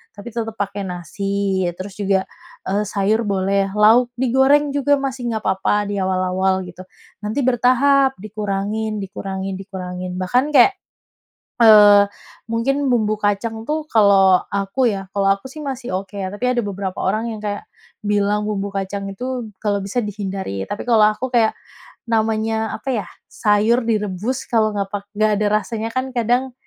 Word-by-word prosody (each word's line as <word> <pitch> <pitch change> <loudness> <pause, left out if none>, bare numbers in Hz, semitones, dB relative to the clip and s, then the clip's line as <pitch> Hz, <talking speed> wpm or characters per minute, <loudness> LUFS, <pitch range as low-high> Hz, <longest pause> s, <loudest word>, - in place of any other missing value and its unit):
tapi 205 +3 -9
tetep 225 -1 -2
pakai 200 0 -3
nasi, 195 +2 -2
ya - - -4
terus 190 +1 -7
juga, 195 -1 +1 0.4
eee, 200 +2 +1
sayur 205 +3 +1
boleh, 195 0 0
lauk 225 +4 +5
digoreng 265 +4 +3
juga 285 0 +3
masih 265 -3 -3
nggak 220 -1 -3
apa-apa 200 +2 +1
di - - -2
awal-awal 185 0 0
gitu. 180 +1 -10 0.4
Nanti 215 +6 -2
bertahap 265 +2 +3
dikurangin, 210 +1 -3
dikurangin, 195 0 -5
dikurangin, 185 -2 -6
bahkan 245 +10 +1
kayak, 280 +10 +6 0.8
eee, 205 -3 +8 0.4
mungkin 275 +5 0
bumbu 215 -3 +2
kacang 220 +2 -2
tuh 305 0 -1
kalau 195 -4 +5
aku 200 +6 +1
ya, 195 -2 -3
kalau 200 -1 +1
aku 200 - -29
sih 305 - -9
masih 265 -3 -5
oke, 195 +2 -9
tapi 200 +4 -3
ada 250 -1 +1
beberapa 195 -2 -4
orang 215 +4 0
yang 210 - -9
kayak 205 -1 -4 0.3
bilang 205 0 0
bumbu 200 -1 -2
kacang 195 0 -4
itu 245 +2 -5
kalau 205 -2 0
bisa 200 +5 -2
dihindari, 195 - -4
tapi 205 - -4
kalau 225 -3 +5
aku 260 +5 -4
kayak 225 -2 +3 0.6
namanya 220 0 0
apa 270 - -7 0.2
ya, - - -15 0.2
sayur 215 +3 +2
direbus 215 +3 -2
kalau 220 -3 +2
nggak 200 -1 -2
pak 205 -1 -3
nggak 215 0 +3
ada 210 - +2
rasanya 225 +1 -4
kan 255 +1 -1
kadang 245 +2 +1
210 Hz, 155 wpm, -20 LUFS, 195-235 Hz, 0.8 s, eee